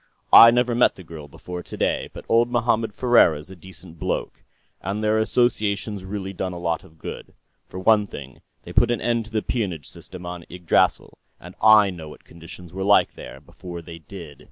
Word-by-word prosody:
I 115 - +11
never 120 +1 +1
met 120 +1 +3
the 95 - -12
girl 80 -3 -10
before 90 +5 -8
today, - - -2
but - - -11
old 115 +1 +3
Mohammed 115 -2 0
Ferriera's 95 -10 +2
a - - -10
decent 90 -2 -14
bloke. - - -3 0.4
And 100 +4 -4
their 110 +1 +2
association's 105 -4 0
really 95 0 -5
done 95 0 -4
a - - -7
lot 85 -2 -2
of 80 - -19
good. - - -9 0.3
For 95 - -8
one 105 +1 +3
thing, 70 -7 -11 0.2
they - - -10
put - - +4
an 120 - 0
end 120 -1 -1
to 110 - -15
the 110 -1 -1
peonage 90 - -3
system 90 -1 -12
on 90 -1 -7
Yggdrasill, 90 -1 0 0.2
and 90 +1 -12
I 105 -2 +6
know 80 -4 -9
what - - -14
conditions 85 +1 -12
were 95 +1 -4
like, 100 +1 +3
there, - - -11
before 85 -2 -10
they 85 -1 -10
did." 80 -3 -11
95 Hz, 195 wpm, -23 LUFS, 85-110 Hz, 0.4 s, I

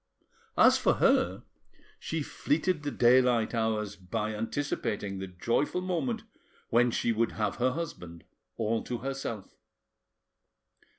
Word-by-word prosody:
As - - +6
for - - +3
her, - - +2 0.6
she - - -3
fleeted 185 - 0
the 145 - -2
daylight 125 -3 +4
hours 110 -3 -1
by 105 +3 -3
anticipating 105 -4 -3
the 95 - -5
joyful 115 - -1
moment 220 +6 -2 0.5
when 120 +1 +4
she 120 - 0
would 115 0 0
have 105 -3 -1
her 125 +1 +2
husband 90 - -6 0.3
all 115 0 0
to 125 - -3
herself. 130 -6 -5
115 Hz, 120 wpm, -29 LUFS, 105-135 Hz, 0.6 s, As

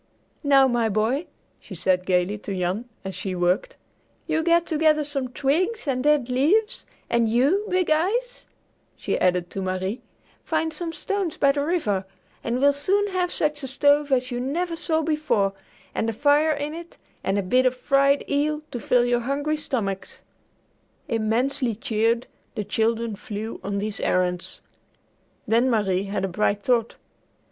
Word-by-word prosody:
"Now, 275 -2 +5
my 240 -3 +1
boy," 225 - 0 0.3
she - - -10
said 185 -1 0
gayly 185 +3 +1
to 200 -2 -5
Jan 185 +7 -2 0.2
as 190 - -4
she 190 -1 -4
worked, 180 - 0 0.5
"you 320 - 0
get 340 +1 +3
together 310 -1 +2
some 280 -3 -2
twigs 325 - -1
and 255 -2 0
dead 295 -4 +3
leaves, 320 - +1 0.2
and 235 -1 +2
you, 285 - +2
Big 365 -3 +1
Eyes," 460 +11 0 0.5
she - - -2
added 180 -1 +1
to 195 - -4
Marie, 190 +4 -2 0.4
"find 320 0 -1
some 330 +2 -4
stones 380 0 -3
by 280 - +4
the 285 0 -1
river, 285 - 0 0.4
and 235 +2 -1
we'll 285 +1 +5
soon 390 +9 +1
have 365 -2 0
such 295 -1 -1
a 270 - -5
stove 285 +2 +2
as 255 -1 +1
you 245 - -2
never 335 +7 -2
saw 320 -1 0
before, 300 -11 +1 0.4
and 225 - -1
a - - -2
fire 290 +6 +3
in 290 +1 -4
it, 340 +1 -10 0.3
and 195 +1 0
a 200 - 0
bit 255 +7 +3
of 255 0 -1
fried 275 +1 +2
eel, 300 +2 0
to 245 - -4
fill 245 +1 +2
your 245 0 +2
hungry 285 +5 -1
stomachs." 205 -10 -3 0.9
Immensely 230 +2 0
cheered, 225 +2 0 0.3
the 215 - -2
children 225 +1 0
flew 215 +1 -6
on 200 0 -2
these 205 +1 -3
errands. 180 -1 -1 0.8
Then 230 +4 +3
Marie 200 -5 +1
had 195 -1 -2
a - - -1
bright 205 +2 0
thought. 235 -3 +1
255 Hz, 165 wpm, -24 LUFS, 210-305 Hz, 0.9 s, Now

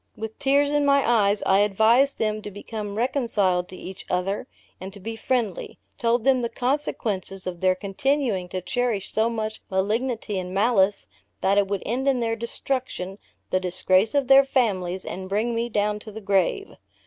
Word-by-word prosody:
With 220 0 -7
tears 285 +1 +3
in 295 0 +2
my 280 -1 +3
eyes, 210 -3 +3
I 190 +1 +4
advised 220 +7 +3
them 215 -1 -1
to 210 - -7
become 205 0 -6
reconciled 215 -7 +1
to 185 - -10
each 190 +1 -9
other, 180 +3 -1 0.3
and 190 +1 -7
to 200 - -11
be 225 +4 -5
friendly; 225 -4 -2 0.2
told 235 0 +1
them 260 -1 +3
the 235 - -1
consequences 225 -8 -2
of 180 -2 -5
their 185 0 +3
continuing 200 0 -1
to 185 - -4
cherish 230 -1 -2
so 220 +1 +2
much 220 -1 -4
malignity 215 +2 -1
and 185 0 -6
malice, 200 - +2 0.4
that 195 +2 +3
it 200 - +1
would 200 -1 -2
end 255 +4 -1
in 265 -2 +3
their 225 -1 0
destruction, 235 -4 -4 0.3
the 185 - +2
disgrace 185 +4 +1
of 280 -2 +2
their 270 +1 +8
families, 190 -9 0
and 185 0 -6
bring 215 +4 0
me 230 +1 -1
down 210 -1 0
to 215 - -10
the 215 - -7
grave. 200 - 0
215 Hz, 180 wpm, -24 LUFS, 190-245 Hz, 0.4 s, their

